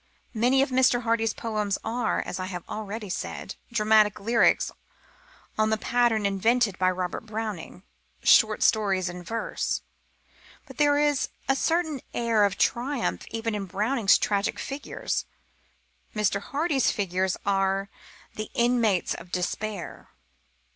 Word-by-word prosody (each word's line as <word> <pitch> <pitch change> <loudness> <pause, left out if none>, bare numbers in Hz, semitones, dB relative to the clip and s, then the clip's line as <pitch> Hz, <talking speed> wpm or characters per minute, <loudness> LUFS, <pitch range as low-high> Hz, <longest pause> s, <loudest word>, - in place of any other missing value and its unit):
Many 250 +4 +3
of 275 - -3
Mr. 255 -1 +3
Hardy's 225 -1 +1
poems 210 -3 -1
are, 230 +1 -1
as 185 - -5
I 185 - -3
have 180 -3 -7
already 215 0 -5
said, 180 - -5 0.2
dramatic 215 -2 +3
lyrics 230 +3 +3 0.9
on 215 0 +3
the 220 - +1
pattern 235 -2 +1
invented 205 +1 +2
by 185 0 +4
Robert 185 +4 -3
Browning 215 -5 -5 0.4
short - - +5
stories 195 -4 +2
in 180 0 -7
verse. 225 +6 -3 0.8
But - - -13
there 290 -1 +4
is 295 -2 +1 0.2
a 270 - +3
certain 315 -2 0
air 230 -3 +3
of 195 -1 -1
triumph 250 +1 0
even 225 0 -3
in 200 -2 -3
Browning's 210 +3 +3
tragic 200 0 0
figures. 280 +1 -4 0.9
Mr. 210 -1 +1
Hardy's 285 +2 +1
figures 190 -3 -1
are 195 0 +1 0.5
the 215 0 -5
inmates 235 -6 +2
of 175 - -10
despair. 190 +1 -4
215 Hz, 130 wpm, -26 LUFS, 195-240 Hz, 0.9 s, short